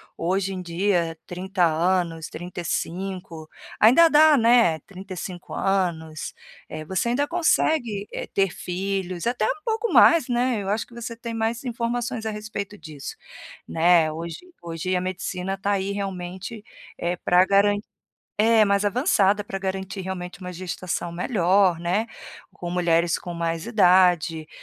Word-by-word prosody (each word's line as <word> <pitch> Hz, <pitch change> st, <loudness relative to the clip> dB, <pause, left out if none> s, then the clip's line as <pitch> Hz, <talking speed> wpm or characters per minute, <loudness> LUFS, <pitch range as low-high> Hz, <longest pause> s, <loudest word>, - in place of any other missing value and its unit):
hoje 190 Hz, +3 st, -1 dB
em 185 Hz, -, -5 dB
dia 175 Hz, -1 st, 0 dB
30 185 Hz, +1 st, -1 dB
anos, 165 Hz, 0 st, 0 dB
35, 175 Hz, -1 st, -5 dB, 0.3 s
ainda 255 Hz, +10 st, +7 dB
dá, 310 Hz, -1 st, +6 dB
né, 230 Hz, -8 st, +5 dB
35 185 Hz, -1 st, -8 dB
anos, 170 Hz, -5 st, -1 dB, 0.4 s
eh, 155 Hz, -, -6 dB
você 190 Hz, +7 st, -1 dB
ainda 280 Hz, +4 st, +1 dB
consegue, 290 Hz, -, +1 dB
eh, -, -, -5 dB
ter 195 Hz, -2 st, +1 dB
filhos, 185 Hz, -1 st, -3 dB
até 240 Hz, -2 st, 0 dB
um 410 Hz, -, -3 dB
pouco 450 Hz, 0 st, -1 dB
mais, 335 Hz, -4 st, +6 dB
né. 245 Hz, -2 st, +1 dB
Eu 195 Hz, -, -4 dB
acho 210 Hz, +3 st, 0 dB
que -, -, -20 dB
você 235 Hz, 0 st, -6 dB
tem 230 Hz, 0 st, -6 dB
mais 225 Hz, +2 st, -2 dB
informações 235 Hz, -1 st, -2 dB
a -, -, 0 dB
respeito 210 Hz, -1 st, -6 dB
disso, 150 Hz, -6 st, -8 dB, 0.5 s
né. 165 Hz, -1 st, +4 dB
Hoje 165 Hz, +1 st, -6 dB, 0.2 s
hoje 170 Hz, +2 st, -3 dB
a 180 Hz, -, 0 dB
medicina 185 Hz, +1 st, -3 dB
tá 200 Hz, +1 st, -1 dB
aí 195 Hz, 0 st, 0 dB
realmente, 195 Hz, +2 st, -5 dB, 0.4 s
eh, 175 Hz, +1 st, -1 dB
pra 180 Hz, +1 st, +4 dB
garan 200 Hz, +1 st, +3 dB, 0.6 s
é, 220 Hz, 0 st, +5 dB
mais 200 Hz, 0 st, +2 dB
avançada, 205 Hz, -, +2 dB
pra 195 Hz, -1 st, -5 dB
garantir 190 Hz, 0 st, -4 dB
realmente 180 Hz, 0 st, -6 dB
uma 180 Hz, 0 st, -6 dB
gestação 180 Hz, -1 st, -4 dB
melhor, 180 Hz, -1 st, +2 dB
né, 180 Hz, +6 st, 0 dB, 0.5 s
com 175 Hz, -, -6 dB
mulheres 170 Hz, -1 st, +2 dB
com 175 Hz, -, -7 dB
mais 165 Hz, -1 st, -2 dB
idade, 180 Hz, -7 st, +3 dB
190 Hz, 145 wpm, -24 LUFS, 175-215 Hz, 0.6 s, ainda